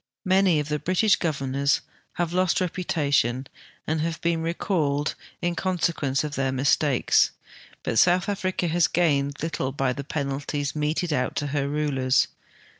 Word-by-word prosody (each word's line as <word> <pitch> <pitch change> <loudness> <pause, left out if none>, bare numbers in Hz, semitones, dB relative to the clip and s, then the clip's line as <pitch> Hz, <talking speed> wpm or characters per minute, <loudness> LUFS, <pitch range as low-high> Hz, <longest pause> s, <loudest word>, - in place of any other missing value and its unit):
Many 185 -3 +4
of 150 - -3
the 150 0 -1
British 185 +5 +3
governors 140 -3 0 0.3
have 175 -1 -2
lost 185 -1 +2
reputation 145 -8 0 0.4
and 160 0 -1
have 165 0 -2
been 170 -1 0
recalled 160 -4 0 0.3
in 175 0 0
conse 180 -2 0
quence 140 -2 -1
of 150 -1 -4
their 135 -1 0
mistakes, 135 0 +3 0.5
l^ut 115 - +1
South 180 +1 +4
Africa 185 -3 -1
has 170 +1 +3
gained 145 -4 +1
little 155 -5 -2
by 135 -2 0
the 140 - -6
penalties 145 0 -3
meted 155 +2 -1
out 125 -3 -1
to 145 - -1
her 140 -1 0
rulers. 140 -3 +1
150 Hz, 150 wpm, -25 LUFS, 140-175 Hz, 0.5 s, Many